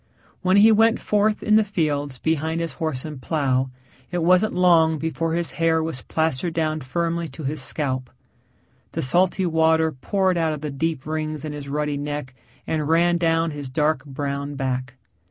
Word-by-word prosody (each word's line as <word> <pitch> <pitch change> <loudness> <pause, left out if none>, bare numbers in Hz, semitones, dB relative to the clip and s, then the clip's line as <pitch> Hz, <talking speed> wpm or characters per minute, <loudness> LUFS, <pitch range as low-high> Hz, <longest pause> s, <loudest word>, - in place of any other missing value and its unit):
When 185 +1 +3
he 215 +2 +7
went 225 +1 +4
forth 210 +1 +1
in 215 0 +4
the 220 - +4
fields 145 -9 -1
behind 160 +3 -1
his 165 -1 -3
horse 155 -5 -3
and 150 -4 -7
plow, 130 -4 0 0.4
it 175 -1 -2
wasn't 185 +5 +3
long 165 -3 +4
before 160 +1 -2
his 170 -1 -1
hair 160 -1 +3
was 160 -6 -4
plastered 160 +1 -1
down 155 -1 0
firmly 170 +4 -2
to 155 +2 -10
his 145 +1 -2
scalp. 130 -2 -2 0.8
The - - -2
salty 180 +7 +2
water 160 -1 +3
poured 185 +6 0
out 160 -1 +1
of 150 - -6
the 150 -1 -4
deep 155 0 -2
rings 155 -1 -3
in 150 - -5
his 145 -1 -7
ruddy 150 0 -1
neck 145 -2 -4 0.3
and 155 -2 -2
ran 170 +1 +3
down 165 -1 +1
his 145 -2 -6
dark 150 0 +1
brown 140 0 -4
back. 130 -2 -3
160 Hz, 175 wpm, -23 LUFS, 145-170 Hz, 0.8 s, he